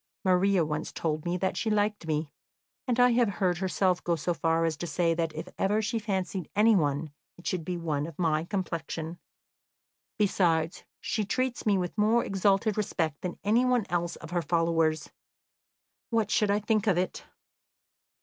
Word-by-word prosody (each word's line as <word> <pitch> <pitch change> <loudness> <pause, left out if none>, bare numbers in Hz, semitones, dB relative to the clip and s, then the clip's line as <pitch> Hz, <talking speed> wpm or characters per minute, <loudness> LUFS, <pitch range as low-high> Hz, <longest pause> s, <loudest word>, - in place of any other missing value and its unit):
"Maria 185 -1 +3
once 150 +1 -3
told 155 -1 -2
me 175 +1 0
that 190 +1 -1
she 225 - -1
liked 210 -4 0
me, 155 -1 -2 0.5
and 245 -1 +1
I 245 0 +6
have 235 -2 +3
heard 180 -3 +1
herself 185 -1 +1
go 170 - +1
so 170 +2 -1
far 165 0 +1
as 160 -1 0
to 175 - -4
say 165 +1 +1
that 165 -1 -1
if 160 +3 -5
ever 205 +2 +2
she 225 +2 -1
fancied 190 -4 -3
anyone, 160 -9 +3 0.3
it 175 - -16
should 180 -3 -1
be 180 +2 -3
one 155 -3 -2
of 165 - -10
my 160 -3 +1
complexion. 170 -3 -4 1.0
Besides, 175 -4 +1 0.2
she 215 - -1
treats 245 +3 -2
me 200 -2 +4
with 180 -2 -3
more 225 +3 +3
exalted 195 +2 +1
respect 165 -7 -1
than 180 - -4
any 225 +4 +3
one 250 -4 +2
else 175 -1 -1
of 165 0 -11
her 175 -1 +1
followers. 165 -1 +1 1.0
What 225 -3 0
should 210 - +2
I 205 +1 +2
think 215 0 +1
of 190 -4 +3
it?" 185 +1 -2
180 Hz, 175 wpm, -28 LUFS, 165-210 Hz, 1.0 s, I